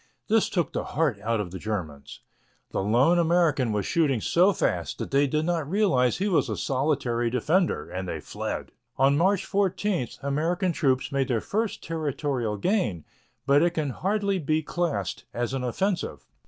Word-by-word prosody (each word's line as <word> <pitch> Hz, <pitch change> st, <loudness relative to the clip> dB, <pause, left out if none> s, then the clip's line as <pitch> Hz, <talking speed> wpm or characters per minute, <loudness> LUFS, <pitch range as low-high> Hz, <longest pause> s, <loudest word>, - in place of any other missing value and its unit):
This 220 Hz, 0 st, +3 dB
took 170 Hz, -7 st, -1 dB
the -, -, -1 dB
heart 145 Hz, -9 st, 0 dB
out 115 Hz, +1 st, 0 dB
of 95 Hz, -4 st, -4 dB
the 95 Hz, -, -6 dB
Germans. 80 Hz, -10 st, -5 dB, 0.5 s
The -, -, -1 dB
lone 125 Hz, -, +3 dB
American 165 Hz, -7 st, +2 dB
was 105 Hz, -2 st, -1 dB
shooting 145 Hz, -7 st, +2 dB
so 180 Hz, -, +4 dB
fast 85 Hz, -, -1 dB
that -, -, -5 dB
they 140 Hz, +1 st, +3 dB
did 155 Hz, +3 st, 0 dB
not 165 Hz, -4 st, -1 dB
realize 165 Hz, -, +2 dB
he 195 Hz, +4 st, 0 dB
was 170 Hz, -, +2 dB
a 105 Hz, -, -2 dB
solitary 130 Hz, -, 0 dB
defender, 160 Hz, -, +1 dB
and 95 Hz, 0 st, -5 dB
they 80 Hz, -, -3 dB
fled. -, -, -5 dB, 0.3 s
On 135 Hz, +1 st, +4 dB
March 185 Hz, +5 st, +2 dB
14 195 Hz, -, 0 dB, 0.2 s
American 165 Hz, +6 st, 0 dB
troops 135 Hz, -5 st, 0 dB
made 135 Hz, -1 st, 0 dB
their 120 Hz, -3 st, +1 dB
first 215 Hz, -, -2 dB
territorial 145 Hz, -8 st, -2 dB
gain, 110 Hz, -, 0 dB, 0.4 s
but 140 Hz, +1 st, +5 dB
it 175 Hz, +1 st, +2 dB
can 150 Hz, -4 st, -1 dB
hardly 200 Hz, -, 0 dB
be 155 Hz, 0 st, 0 dB
classed 150 Hz, -, -2 dB
as 120 Hz, +2 st, -2 dB
an 135 Hz, -1 st, -2 dB
offensive. 175 Hz, -, -2 dB
145 Hz, 170 wpm, -26 LUFS, 120-175 Hz, 0.5 s, but